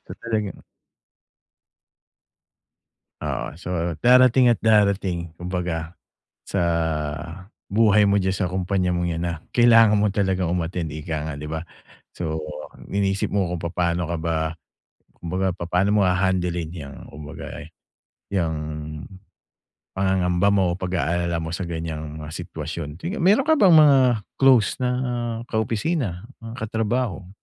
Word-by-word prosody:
So, -, -, -8 dB
talagang 110 Hz, -5 st, -2 dB, 2.6 s
Oo. -, -, -3 dB
So, 90 Hz, -, -7 dB, 0.3 s
darating 125 Hz, +1 st, +6 dB
at 120 Hz, -2 st, +3 dB
darating 100 Hz, -6 st, +2 dB
kumbaga 90 Hz, -1 st, -4 dB, 0.5 s
sa -, -, -2 dB, 1.1 s
buhay 105 Hz, 0 st, +5 dB
mo 100 Hz, 0 st, +3 dB
diyan 95 Hz, 0 st, 0 dB
sa 90 Hz, -3 st, -1 dB
kumpanya 90 Hz, 0 st, 0 dB
mong 85 Hz, 0 st, 0 dB
’yan 85 Hz, 0 st, -2 dB
na 85 Hz, -1 st, -1 dB, 0.2 s
kailangan 115 Hz, -3 st, +6 dB
mo 105 Hz, 0 st, +2 dB
talagang 95 Hz, -4 st, 0 dB
um-attend, 85 Hz, -2 st, -2 dB
ika 80 Hz, 0 st, -4 dB
nga, -, -, -5 dB
di 75 Hz, -, -6 dB
ba? 80 Hz, +1 st, -4 dB, 0.5 s
So, 80 Hz, -2 st, -4 dB, 0.5 s
iniisip 100 Hz, 0 st, 0 dB
mo 100 Hz, -3 st, +1 dB
kung 90 Hz, -, -3 dB
papaano 85 Hz, 0 st, 0 dB
ka 85 Hz, -, -1 dB
ba 80 Hz, 0 st, -1 dB, 0.8 s
kumbaga, 95 Hz, +2 st, -1 dB
papaano 90 Hz, +4 st, +1 dB
mo -, -, +4 dB
hahandlein 90 Hz, -3 st, 0 dB
'yang 70 Hz, -5 st, -8 dB
kumbaga, 75 Hz, 0 st, -9 dB, 0.2 s
eh, 80 Hz, -, -14 dB, 0.6 s
'yang 85 Hz, -5 st, +1 dB, 1.4 s
pangangamba 95 Hz, -1 st, +1 dB
mo, 100 Hz, -1 st, +3 dB
pag-aalala 85 Hz, -2 st, -1 dB
mo 80 Hz, 0 st, -4 dB
sa 95 Hz, -, -4 dB
ganyang 80 Hz, -2 st, -5 dB
mga 75 Hz, 0 st, -7 dB
sitwasyon. 75 Hz, -1 st, -6 dB
Sige, 185 Hz, -, -4 dB
meron 210 Hz, +10 st, +4 dB
ka 315 Hz, -, +5 dB
bang 200 Hz, -, +5 dB
mga 150 Hz, -3 st, +7 dB, 0.4 s
close 130 Hz, -6 st, +5 dB
na 125 Hz, -, +2 dB, 0.6 s
kaopisina, 110 Hz, -, -1 dB, 0.2 s
mga 115 Hz, +1 st, -7 dB
katrabaho? 110 Hz, -3 st, -2 dB
90 Hz, 125 wpm, -23 LUFS, 85-105 Hz, 2.6 s, mga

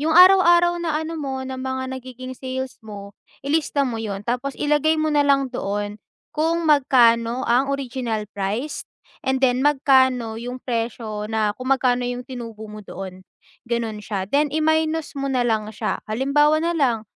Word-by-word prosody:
yung 320 Hz, +2 st, +1 dB
araw-araw 350 Hz, -2 st, +6 dB
na 325 Hz, -3 st, -1 dB
ano 320 Hz, 0 st, -5 dB
mo 265 Hz, -2 st, -4 dB
na 260 Hz, 0 st, -6 dB
mga 260 Hz, 0 st, -3 dB
nagiging 255 Hz, 0 st, -8 dB
sales 260 Hz, 0 st, -6 dB
mo, 205 Hz, -2 st, -10 dB, 0.3 s
ilista 285 Hz, -1 st, +1 dB
mo 230 Hz, -3 st, -3 dB
'yon 205 Hz, -2 st, -5 dB
tapos 250 Hz, +3 st, -2 dB
ilagay 300 Hz, +2 st, +2 dB
mo 310 Hz, 0 st, 0 dB
na 295 Hz, -, +3 dB
lang 275 Hz, -2 st, +2 dB
doon 205 Hz, -2 st, -3 dB, 0.3 s
kung 330 Hz, +2 st, 0 dB
magkano 250 Hz, -5 st, +4 dB
ang 255 Hz, +4 st, +2 dB
original 250 Hz, -5 st, -2 dB
price 205 Hz, +9 st, -3 dB, 0.4 s
and 265 Hz, 0 st, +1 dB
then 250 Hz, 0 st, +2 dB
magkano 260 Hz, -5 st, +3 dB
yung 245 Hz, +2 st, -5 dB
presyo 225 Hz, -3 st, -4 dB
na 215 Hz, -1 st, 0 dB
kung 255 Hz, +4 st, -7 dB
magkano 250 Hz, -2 st, +2 dB
yung 245 Hz, 0 st, -3 dB
tinubo 230 Hz, -4 st, -8 dB
mo 215 Hz, -, -9 dB
doon, 185 Hz, -2 st, -9 dB, 0.4 s
gano'n 235 Hz, -2 st, -2 dB
siya. 205 Hz, -2 st, -4 dB
Then 290 Hz, +3 st, +3 dB
i-minus 315 Hz, -1 st, 0 dB
mo 275 Hz, -, -2 dB
na 260 Hz, -2 st, +1 dB
lang 220 Hz, -3 st, 0 dB
siya. -, -, -2 dB
Halimbawa 295 Hz, +7 st, +2 dB
na 340 Hz, -, +1 dB
lang, 260 Hz, -9 st, +1 dB
260 Hz, 165 wpm, -22 LUFS, 230-290 Hz, 0.4 s, araw-araw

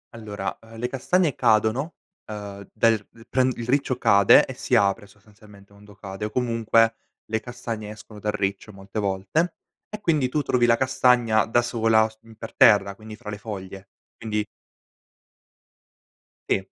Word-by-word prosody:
Allora, 105 Hz, -3 st, -5 dB
ehm, 115 Hz, 0 st, -14 dB
le 120 Hz, +2 st, -2 dB
castagne 155 Hz, +4 st, +1 dB
cadono, 115 Hz, +6 st, +1 dB, 0.3 s
ehm, 100 Hz, -2 st, -8 dB
dal 110 Hz, -1 st, +2 dB, 0.3 s
pren 130 Hz, 0 st, +2 dB
il 120 Hz, 0 st, -6 dB
riccio 135 Hz, -1 st, +1 dB
cade, 100 Hz, -5 st, +6 dB
e -, -, -7 dB
si -, -, -1 dB
apre 100 Hz, 0 st, +2 dB
sostanzialmente 105 Hz, -1 st, -19 dB
quando 105 Hz, 0 st, -17 dB
cade, 95 Hz, +1 st, -7 dB
o 105 Hz, -, -3 dB
comunque 115 Hz, -2 st, +2 dB, 0.3 s
le 110 Hz, 0 st, -2 dB
castagne 115 Hz, -3 st, -6 dB
escono 105 Hz, 0 st, -11 dB
dal 105 Hz, +1 st, -1 dB
riccio 100 Hz, +1 st, -3 dB
molte 100 Hz, +2 st, -7 dB
volte, 100 Hz, -, -1 dB, 0.3 s
e 210 Hz, 0 st, -8 dB
quindi 150 Hz, -8 st, +1 dB
tu 150 Hz, -, 0 dB
trovi 120 Hz, -2 st, +2 dB
la 115 Hz, 0 st, +4 dB
castagna 125 Hz, -4 st, +3 dB
da 120 Hz, +2 st, +3 dB
sola 115 Hz, -2 st, +2 dB
s 110 Hz, 0 st, -18 dB, 0.2 s
per 115 Hz, -, -9 dB
terra, 100 Hz, -2 st, +5 dB
quindi 110 Hz, 0 st, -11 dB
fra 105 Hz, -2 st, -9 dB
le 100 Hz, -, -5 dB
foglie, 95 Hz, -2 st, -8 dB, 0.3 s
quindi 105 Hz, -2 st, -2 dB, 2.0 s
sì. 95 Hz, -, +1 dB
110 Hz, 155 wpm, -24 LUFS, 105-120 Hz, 2.0 s, cade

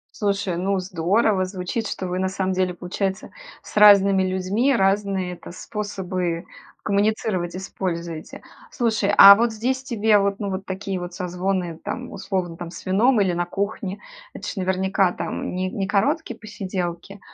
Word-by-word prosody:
Слушай, 200 Hz, -4 st, -1 dB
ну 195 Hz, +2 st, 0 dB
здорово! 185 Hz, +3 st, +1 dB
Звучит, 185 Hz, +4 st, -4 dB
что 185 Hz, -, -4 dB
вы 180 Hz, +1 st, -2 dB
на 190 Hz, 0 st, 0 dB
самом 190 Hz, 0 st, -1 dB
деле, 185 Hz, -1 st, 0 dB
получается, 190 Hz, +3 st, -3 dB, 0.3 s
с -, -, -13 dB
разными 200 Hz, -2 st, +7 dB
людьми 190 Hz, +8 st, +1 dB
разные 195 Hz, -2 st, +1 dB
это 175 Hz, -, -11 dB
способы 185 Hz, -3 st, -4 dB, 0.4 s
коммуницировать 200 Hz, -3 st, 0 dB
используете. 170 Hz, -4 st, -5 dB, 0.3 s
Слушай, 220 Hz, -5 st, 0 dB
а 200 Hz, 0 st, +12 dB
вот 230 Hz, +3 st, +2 dB
здесь 250 Hz, +4 st, -1 dB
тебе, 220 Hz, -4 st, +2 dB
вот 200 Hz, 0 st, 0 dB
ну 200 Hz, -2 st, -3 dB
вот 190 Hz, +1 st, -5 dB
такие 190 Hz, 0 st, -4 dB
вот 175 Hz, 0 st, -7 dB
созвоны 180 Hz, -2 st, -2 dB
там, 250 Hz, 0 st, -5 dB
условно, 180 Hz, -4 st, -3 dB
там 175 Hz, -1 st, -6 dB
с 170 Hz, -, -11 dB
вином 215 Hz, +5 st, +3 dB
или 190 Hz, -3 st, +2 dB
на 175 Hz, 0 st, -1 dB
кухне- 200 Hz, 0 st, -3 dB, 0.3 s
это -, -, -7 dB
ж -, -, -4 dB
наверняка 190 Hz, 0 st, +1 dB
там -, -, -4 dB
не 185 Hz, 0 st, -2 dB
не 195 Hz, -1 st, -2 dB
короткие 240 Hz, -, 0 dB
посиделки. 190 Hz, -2 st, -5 dB
190 Hz, 155 wpm, -23 LUFS, 180-205 Hz, 0.4 s, а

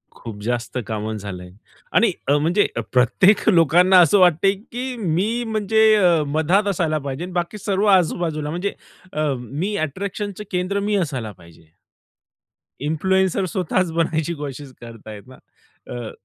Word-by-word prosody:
खूप 110 Hz, -3 st, -9 dB
जास्त 120 Hz, +2 st, -3 dB
कामच 110 Hz, -1 st, -4 dB
झालंय 90 Hz, -3 st, -8 dB, 0.5 s
आणि -, -, +4 dB, 0.2 s
अ, 145 Hz, +1 st, +4 dB
म्हणजे 175 Hz, +7 st, +2 dB, 0.3 s
प्रत्येक 155 Hz, -, +3 dB
लोकांना 180 Hz, +1 st, +5 dB
असं 175 Hz, +4 st, +5 dB
वाटतंय, 180 Hz, +2 st, +4 dB
की 245 Hz, +5 st, -6 dB
मी 200 Hz, +8 st, 0 dB
म्हणजे 220 Hz, 0 st, +1 dB
अ, 175 Hz, -6 st, +3 dB
मधात 160 Hz, +8 st, +1 dB
असायला 165 Hz, -5 st, 0 dB
पाहिजे 140 Hz, +2 st, -5 dB
आणि 180 Hz, -, -7 dB
बाकी 175 Hz, +3 st, -2 dB
सर्व 200 Hz, 0 st, -1 dB
आजूबाजूला 160 Hz, -3 st, -2 dB
म्हणजे 175 Hz, +5 st, -3 dB, 0.4 s
अ, 150 Hz, -2 st, 0 dB
मी 150 Hz, -, -4 dB
अट्रॅक्शनचं 200 Hz, +5 st, -5 dB
केंद्र 185 Hz, +2 st, -1 dB
मी 205 Hz, +1 st, -1 dB
असायला 135 Hz, -, -2 dB
पाहिजे. 85 Hz, -3 st, -19 dB, 1.2 s
इन्फ्लुएन्सर 190 Hz, +4 st, +1 dB
स्वतःच 185 Hz, -2 st, 0 dB
बनायची 165 Hz, 0 st, -1 dB
कोशिश 145 Hz, -2 st, -7 dB
करतात 115 Hz, -2 st, -12 dB
आहे 105 Hz, -1 st, -8 dB
ना. 130 Hz, -, -14 dB, 0.6 s
अ, 120 Hz, -3 st, -6 dB
170 Hz, 140 wpm, -21 LUFS, 135-195 Hz, 1.2 s, लोकांना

